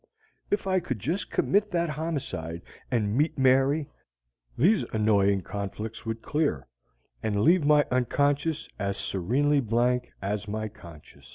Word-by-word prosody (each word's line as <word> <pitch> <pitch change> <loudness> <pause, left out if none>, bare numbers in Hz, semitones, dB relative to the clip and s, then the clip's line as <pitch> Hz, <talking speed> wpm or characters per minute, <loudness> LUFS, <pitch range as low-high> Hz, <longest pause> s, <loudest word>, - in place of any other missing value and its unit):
If 205 - 0
I 190 -1 +2
could 150 -9 -4
just 160 - -3
commit 205 +1 +1
that 170 -3 0
homicide 140 - -4 0.3
and 110 -4 0
meet 150 +4 +1
Mary, 135 +3 +3 0.7
these 190 - +4
annoying 100 -3 +3
conflicts 105 +4 -6
would 115 0 -4
clear 145 - 0 0.6
and 105 -2 0
leave 170 - +4
my 150 0 +5
unconscious 145 +5 +1
as 100 -1 -2
serenely 135 +11 +1
blank 125 +1 +1
as 105 +1 -3
my 110 +1 -3
conscious. 85 -7 -15
125 Hz, 130 wpm, -27 LUFS, 105-150 Hz, 0.7 s, my